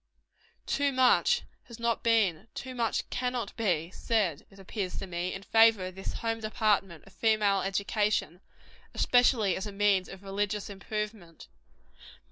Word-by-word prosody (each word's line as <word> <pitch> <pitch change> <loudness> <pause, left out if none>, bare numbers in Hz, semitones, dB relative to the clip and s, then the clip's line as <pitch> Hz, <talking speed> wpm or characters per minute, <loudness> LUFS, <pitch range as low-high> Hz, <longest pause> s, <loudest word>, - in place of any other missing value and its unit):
Ton 280 -1 0
much 260 - +4 0.2
has 235 -1 -12
not 235 -1 0
been 220 -5 +2
too 260 0 -6
much 235 -2 -1
cannot 250 -4 -2
be 180 -7 0
said, 195 -9 -1
it 195 - -19
appears 195 -1 -5
to - - -4
me, 180 0 -3
in 195 - -6
favor 225 -3 +5
of 185 - -6
this 190 +1 -6
home 225 0 -2
department 210 -6 0
of 195 - -18
female 210 -3 +2
education 200 -2 -1 0.5
especially 245 -6 +3
as 195 - -4
a - - -6
means 200 -2 +2
of 195 0 -11
religious 205 +1 -2
improvement. 205 -3 -6
205 Hz, 145 wpm, -29 LUFS, 190-225 Hz, 0.5 s, favor